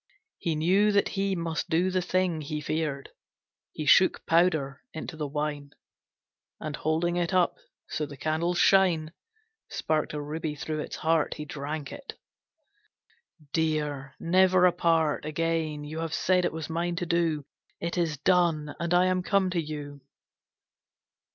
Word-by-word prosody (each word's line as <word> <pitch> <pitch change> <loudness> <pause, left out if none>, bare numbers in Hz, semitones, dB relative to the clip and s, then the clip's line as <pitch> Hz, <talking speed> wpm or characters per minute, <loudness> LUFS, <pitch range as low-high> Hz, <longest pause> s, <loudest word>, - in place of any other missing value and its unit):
He 165 -2 -1
knew 190 +7 +3
that 200 - +3
he 195 -1 -1
must 165 0 -3
do 175 +3 +2
the 185 0 +1
thing 180 -3 0
He 150 +1 -4
feared. 150 -2 -2 0.6
He 155 - -5
shook 185 +5 +5
powder 160 -4 +2
into 160 +1 -6
the 150 -2 -3
wine, 145 0 -3 0.9
And 155 -2 -4
holding 165 +4 0
it 175 0 0
up 180 -1 +3 0.3
so 150 -1 -3
the 145 -1 -10
candle's 160 +5 0
shine 170 -5 +4 0.6
Sparked 155 -1 -1
a - - -2
ruby 150 +1 -4
through 155 +1 -4
its - - -5
heart, 160 -1 +1
He 150 - -6
drank 145 0 -5
it. 285 -1 -9 1.4
"Dear, 150 -4 -1
never 185 +1 +4
apart 165 -4 +2
Again! 155 -1 -1
You 155 +2 -6
have 165 -1 -2
said 180 -1 +2
it - - 0
was 160 -1 -5
mine 170 +1 -2
to 175 +1 -2
do. 165 -4 0 0.3
It 170 0 -3
is 165 -4 0
done, 165 -2 +2
and 170 +1 +1
I 180 +1 +5
am 185 0 +1
come 190 0 +1
to 175 -2 0
you!" 145 -2 -7
160 Hz, 150 wpm, -28 LUFS, 150-175 Hz, 1.4 s, shook